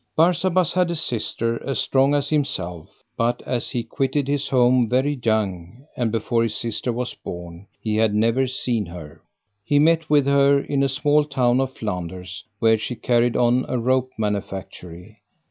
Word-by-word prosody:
Barsabas 175 +1 +2
had 180 -1 +2
a 170 - -1
sister 115 -5 -1
as 135 0 -2
strong 135 +2 +2
as 145 -1 0
himself, 90 - -3
but 120 +1 -1
as 120 -2 -2
he 120 - -2
quitted 135 +1 -1
his 140 0 -1
home 125 -2 +3
very 130 +4 +1
young, 105 +1 -2
and 120 -3 -1
before 115 +1 0
his 115 -2 -1
sister 115 +2 -2
was 125 +1 -3
born, 85 +2 -9
he 110 -1 -2
had 110 -1 +2
never 115 +5 +2
seen 120 -5 -1
her. 80 -2 -10 0.4
He 145 +7 +1
met 160 +2 +3
with 145 -2 +4
her 140 0 +4
in 140 0 -1
a 135 - +2
small 145 +2 +2
town 130 -3 +1
of 130 0 -4
Flanders, 90 -3 -5
where 110 0 +3
she 125 - -4
carried 120 0 +1
on 125 +1 +3
a 125 - 0
rope 130 +2 +1
manufactury. 95 -4 -5
120 Hz, 170 wpm, -22 LUFS, 105-140 Hz, 0.4 s, with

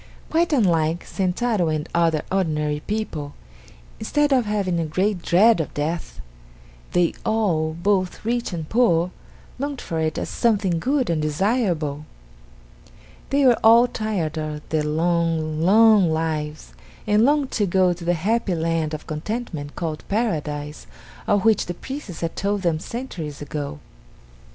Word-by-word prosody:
Quite 330 +1 +2
unlike 170 - +2
Sentaro 190 -1 0
and 155 +1 -2
other 165 -2 +2
ordinary 150 -6 0
people, 160 -9 -3 0.6
instead 295 -1 +1
of 250 -4 +2
having 195 -5 0
a 165 - 0
great 185 +4 0
dread 200 +5 +4
of 155 - -7
death, 160 +3 -3 0.7
they 175 -1 +2
all, 170 -8 +1
both 185 +2 0
rich 240 0 -1
and 165 -3 -5
poor, 180 -7 +2 0.5
longed 280 -1 -3
for 165 - -4
it 160 -1 -1
as - - -2
something 200 -7 +1
good 260 - 0
and 160 -2 0
desirable. 155 - 0 1.2
They 280 0 +2
were 245 -2 +5
all 230 +2 +7
tired 200 -10 -2
of 150 -1 -5
their 155 -1 +1
long, 160 0 0
long 210 0 +6
lives, 155 -1 -3 0.3
and 210 +1 +3
longed 285 +1 +2
to 205 -3 0
go 185 0 +3
to 175 0 -10
the 175 +1 +1
happy 200 +2 0
land 160 -1 -1
of 150 - -9
contentment 155 -2 -5
called 160 -3 -4
Paradise 150 -9 -2 0.4
of 205 0 +2
which 225 -1 +3
the 175 - -4
priests 260 - -7
had 165 -1 -3
told 200 0 -1
them 165 -3 +1
centuries 170 - -6
ago. 145 0 -5
175 Hz, 145 wpm, -23 LUFS, 155-220 Hz, 1.2 s, all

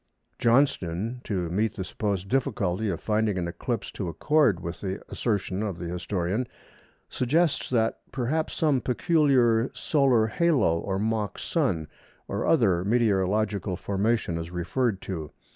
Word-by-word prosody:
Johnston, 115 - +1
to 90 -5 -1
meet 105 +4 0
the 95 - -3
supposed 95 0 -2
difficulty 105 -4 0
of 85 - -2
finding 105 -2 0
an 85 -1 -1
eclipse 105 +7 -3
to 95 -4 -4
accord 115 - +2
with 85 -1 -6
the 95 -1 -3
assertion 100 -4 -1
of 100 -5 -3
the 85 - -6
historian, 90 +5 -2 0.6
suggests 155 +6 +1
that 115 -3 +1
"perhaps 140 +5 -1
some 145 -5 +2
peculiar 130 -4 +3
solar 135 -7 +3
halo 130 - +2
or 95 +2 -2
mock 110 -1 -1
Sun, 80 -2 -1 0.4
or - - -2
other 100 - +3
meteorological 100 -2 +1
formation" 100 -2 0
is 80 0 -5
referred 95 +5 -1
to. 80 -6 -5
105 Hz, 135 wpm, -26 LUFS, 90-125 Hz, 0.6 s, peculiar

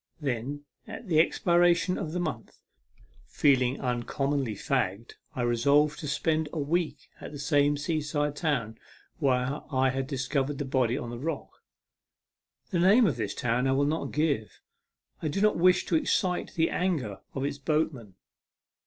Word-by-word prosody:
Then, 140 0 -3 0.2
at 235 - -8
the 160 -4 +3
expiration 175 +2 +3
of 155 - -4
the 180 - -2
month, 170 -3 -5 0.7
feeling 130 -2 +2
uncommonly 130 0 -1
fagged, 100 +3 -1 0.2
I 125 - -1
resolved 140 +5 +3
to 150 - -5
spend 155 +2 0
a - - -6
week 160 +3 -2
at - - -8
the 145 - -7
same 145 0 +2
seaside 150 -1 -1
town 140 -9 -2 0.4
where 130 +1 +1
I 130 -1 +2
had 135 0 -3
discovered 135 +1 -1
the 145 - -3
body 130 -2 +1
on 120 -4 -5
the 120 - -6
rock. 155 +2 -5 1.1
The 175 - +1
name 205 +7 +6
of 150 - +1
this 105 -3 -3
town 120 +2 0
I 135 - +2
will 140 +1 +2
not 155 +3 -2
give. 145 -8 -1 0.6
I 155 - -1
do 155 +6 -2
not 210 +1 +3
wish 180 +1 +4
to 170 - 0
excite 180 +3 0
the 165 -1 +2
anger 150 - -1 0.2
of 135 0 -1
its 145 0 -3
boatmen. 135 - -1
145 Hz, 160 wpm, -28 LUFS, 130-160 Hz, 1.1 s, name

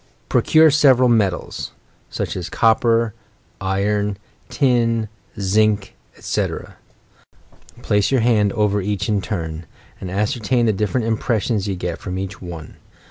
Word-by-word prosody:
Procure 155 -1 +5
several 130 -4 +5
metals, 105 -6 0 0.2
— - - -37
snch - - -3
as 90 -1 -5
copper, 115 0 +2 0.5
iron, 100 +1 0 0.3
tin, 115 -5 +1 0.3
zinc, 100 +1 +1 0.2
etc. - - -3 1.1
Place 105 0 +2
your 130 -3 +2
hands 110 -4 +2
over 105 -2 +1
each 100 0 -2
in 105 -2 +1
turn, 80 -5 -5 0.3
and 95 - -6
as 100 +3 0
certain 120 +1 0
the 110 - +2
different 105 +4 -1
impressions 110 -2 0
you 100 - -2
get 90 -2 -4
from 95 -1 -5
each 95 0 -6
one. 85 -4 -9
105 Hz, 135 wpm, -20 LUFS, 95-115 Hz, 1.1 s, Procure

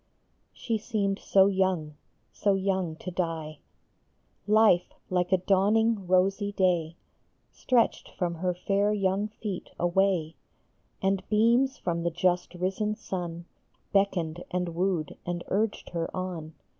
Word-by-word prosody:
i|HE 225 -2 -2
seemed 205 -3 -1
so 190 -1 +4
young, 185 -6 0 0.4
so 200 -1 +1
young 190 -4 -1
to 185 - -7
die! 165 -4 -3 0.9
Life, 210 -4 +4 0.2
like 180 0 +1
a 190 - +5
dawning, 200 +2 +2
rosy 195 +3 +2
day, 175 -4 +1 0.6
Stretched 245 -3 +1
from 175 -2 -2
her 180 +2 -1
fair 200 +3 +1
young 195 0 0
feet 210 -3 -6
away, 175 -2 +1 0.7
And 195 0 +2
beams 235 +5 +3
from 170 -1 -2
the 170 - 0
just 175 +1 0
risen 195 +4 -1
sun 175 -4 -5 0.5
Beckoned 175 -4 +1
and 180 -1 -1
wooed 170 -2 -1
and 175 0 -3
urged 210 +2 -1
her 170 -1 -2
on. 170 -4 -5
185 Hz, 125 wpm, -28 LUFS, 175-200 Hz, 0.9 s, a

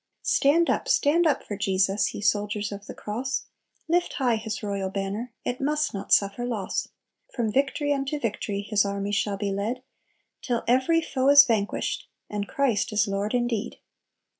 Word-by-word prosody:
"Stand 325 +5 +3
up, - - 0
stand 325 +4 +3
up 295 - +1
for 205 - -5
Jesus! 195 0 +1
Ye - - -7
soldiers 205 0 0
of 200 0 -8
the - - -8
cross; 250 +6 -3 0.4
Lift 350 +2 +1
high 245 -4 +1
His 220 0 -5
royal 200 -2 -2
banner, 200 +5 -4
It 245 +2 -2
must 300 +2 0
not 195 - -6
suffer 200 +4 +3
loss. 230 -6 -2 0.5
"From 230 -4 0
victory 285 +3 +1
to 295 +2 -2
victory 205 -4 -3
His 210 -1 +2
army 200 0 -2
shall 205 -1 0
be 200 0 -2
led, 220 +6 -2 0.6
Till 240 -2 -1
every 260 +7 +3
foe 265 -2 +1
is 285 0 +9
vanquished, 215 -5 -1 0.2
And 205 -1 -3
Christ 240 -7 0
is 210 0 +2
Lord 200 +3 -1
indeed. 240 -2 -1
220 Hz, 165 wpm, -26 LUFS, 200-270 Hz, 0.6 s, is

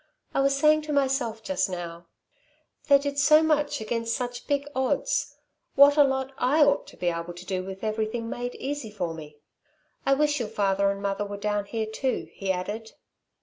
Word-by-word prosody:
I - - +1
was 275 0 +2
saying 305 +2 +4
to - - 0
myself 265 -5 0
just 285 -7 0
now: 170 -1 -6 0.8
'They 280 -1 +7
did 280 0 -3
so 305 +3 +6
much 295 -2 +1
against 230 +1 -2
such 245 -1 -5
big 285 0 0
odds, 260 0 0 0.4
what 285 +1 +7
a 295 - +7
lot 265 -1 -1
I 290 +5 +4
ought 285 - +2
to - - -14
be 175 - 0
able 170 +1 -4
to 180 +1 -10
do 185 -1 -2
with 190 +2 -8
everything 220 +1 -2
made 245 +1 -4
easy 280 -4 -4
for 180 -6 -3
me." 150 -2 -10 0.7
"I 275 - +3
wish 295 0 +1
your 230 -3 -3
father 200 -1 +1
and 200 0 -3
mother 200 +1 -1
were 205 0 -6
down 205 0 -1
here, 220 +2 -3
too," 250 +4 -2
he 195 -1 -2
added. 205 +5 -4
230 Hz, 190 wpm, -26 LUFS, 200-280 Hz, 0.8 s, They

